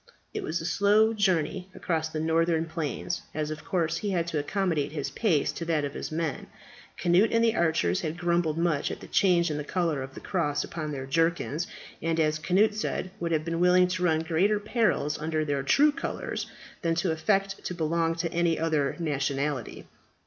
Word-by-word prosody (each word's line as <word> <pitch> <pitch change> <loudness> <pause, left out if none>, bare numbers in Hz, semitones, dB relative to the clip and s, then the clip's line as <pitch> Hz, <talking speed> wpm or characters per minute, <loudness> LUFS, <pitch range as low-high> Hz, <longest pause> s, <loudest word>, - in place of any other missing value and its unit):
It - - -3
was 160 +2 -2
a 165 - -6
slow 210 +5 +4
journey 185 -3 0
across 160 -2 -1
the 160 - -4
northern 165 +1 +2
plains, 165 +2 -3
as 155 0 -2
of 155 -1 -6
course 170 -3 0
he 205 - -3
had 175 -4 0
to 155 - -1
accommodate 160 -3 -1
his 145 -3 -3
pace 175 -11 +1
to 170 - -6
that 160 -3 +1
of 140 - -5
his - - -5
men. 160 -2 -2 0.5
Cnut 180 +5 +4
and 230 0 +3
the 225 -1 +3
archers 160 - +1
had 155 +1 -3
grumbled 170 -3 +1
much 165 -4 +1
at - - -5
the - - -10
change 175 -4 +3
in 150 - -2
the 150 - -3
colour 165 -3 -1
of 135 0 -8
the - - -7
cross 150 -6 -1
upon 155 -2 -5
their 135 -2 -4
jerkins; 165 +2 0 0.3
and, 165 0 0
as 155 -1 +2
Cnut 200 +6 +3
said, 210 -3 -3
would 170 -1 -2
have 155 -1 +1
been 165 0 -2
willing 180 +1 +5
to 185 0 -2
run 160 -2 +3
greater 180 +6 +2
perils 205 - 0
under 155 0 -1
their 145 -2 0
true 285 - +4
colours 330 +3 -4 0.3
than 165 -2 +1
to 170 +1 +1
affect 195 +4 0
to 180 - -4
belong 165 0 0
to 165 0 -3
any 170 -1 +2
other 155 -4 0
nationality. 140 -4 -2
165 Hz, 200 wpm, -27 LUFS, 155-180 Hz, 0.5 s, willing